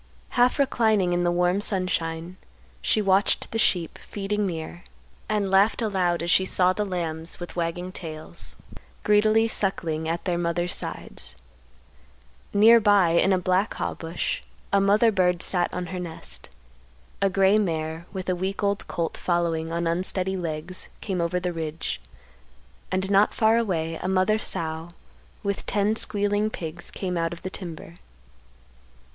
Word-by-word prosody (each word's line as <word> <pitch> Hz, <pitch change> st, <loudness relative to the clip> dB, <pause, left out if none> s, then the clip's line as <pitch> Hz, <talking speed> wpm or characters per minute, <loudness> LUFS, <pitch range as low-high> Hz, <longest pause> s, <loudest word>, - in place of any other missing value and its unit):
Half 245 Hz, 0 st, +3 dB
reclining 220 Hz, -9 st, +2 dB
in 175 Hz, 0 st, +1 dB
the 175 Hz, -, +2 dB
warm 180 Hz, +3 st, +2 dB
sunshine, 180 Hz, -3 st, -2 dB, 0.4 s
she 215 Hz, -, +2 dB
watched 195 Hz, +1 st, +2 dB
the 225 Hz, -, -1 dB
sheep 175 Hz, -6 st, +1 dB
feeding 205 Hz, 0 st, -2 dB
near, 175 Hz, 0 st, -6 dB, 0.5 s
and 205 Hz, -3 st, 0 dB
laughed 195 Hz, +3 st, +4 dB
aloud 185 Hz, -6 st, +1 dB
as 170 Hz, -, 0 dB
she 190 Hz, -, +5 dB
saw 185 Hz, 0 st, +2 dB
the 210 Hz, -, -1 dB
lambs 165 Hz, -3 st, -3 dB
with 175 Hz, -, -7 dB
wagging 175 Hz, +1 st, -2 dB
tails, 155 Hz, -4 st, -9 dB, 0.5 s
greedily 215 Hz, +1 st, +4 dB
suckling 165 Hz, -7 st, -1 dB
at 170 Hz, +1 st, -2 dB
their 175 Hz, -2 st, 0 dB
mother's 175 Hz, +1 st, -1 dB
sides; -, -, -4 dB, 1.2 s
near 225 Hz, +3 st, +7 dB
by 205 Hz, -5 st, +4 dB
in 175 Hz, +3 st, +4 dB
a 190 Hz, -, +4 dB
black 185 Hz, +3 st, +1 dB
haw -, -, -2 dB
bush 165 Hz, +1 st, -3 dB, 0.3 s
a 200 Hz, -, +5 dB
mother 210 Hz, +3 st, +4 dB
bird 180 Hz, -3 st, +2 dB
sat 180 Hz, -2 st, +1 dB
on 180 Hz, 0 st, -3 dB
her 180 Hz, -, -3 dB
nest; 160 Hz, -, -4 dB, 0.7 s
a 195 Hz, -, +4 dB
gray 195 Hz, +2 st, +4 dB
mare, 160 Hz, -3 st, -2 dB
with 190 Hz, -2 st, -5 dB
a 185 Hz, -, +1 dB
week 190 Hz, +3 st, -3 dB
old 200 Hz, 0 st, 0 dB
colt 165 Hz, -2 st, -2 dB
following 165 Hz, -2 st, 0 dB
on 170 Hz, +1 st, -1 dB
unsteady 185 Hz, +2 st, 0 dB
legs, 170 Hz, 0 st, -5 dB
came 190 Hz, -4 st, -2 dB
over 170 Hz, +2 st, 0 dB
the 180 Hz, 0 st, -2 dB
ridge; 160 Hz, -1 st, -4 dB, 0.9 s
and 190 Hz, +1 st, 0 dB
not 200 Hz, +1 st, +4 dB
far 220 Hz, 0 st, +4 dB
away; 165 Hz, -8 st, -1 dB
a -, -, -2 dB
mother 190 Hz, +3 st, +2 dB
sow 160 Hz, -4 st, -3 dB, 0.5 s
with 200 Hz, -1 st, -2 dB
ten 205 Hz, +2 st, +1 dB
squealing 205 Hz, -1 st, +1 dB
pigs 175 Hz, -3 st, -6 dB
came 180 Hz, -2 st, -3 dB
out 165 Hz, 0 st, 0 dB
of 175 Hz, -, -8 dB
the 185 Hz, -, -4 dB
timber. 170 Hz, -2 st, -8 dB
185 Hz, 155 wpm, -25 LUFS, 170-200 Hz, 1.2 s, near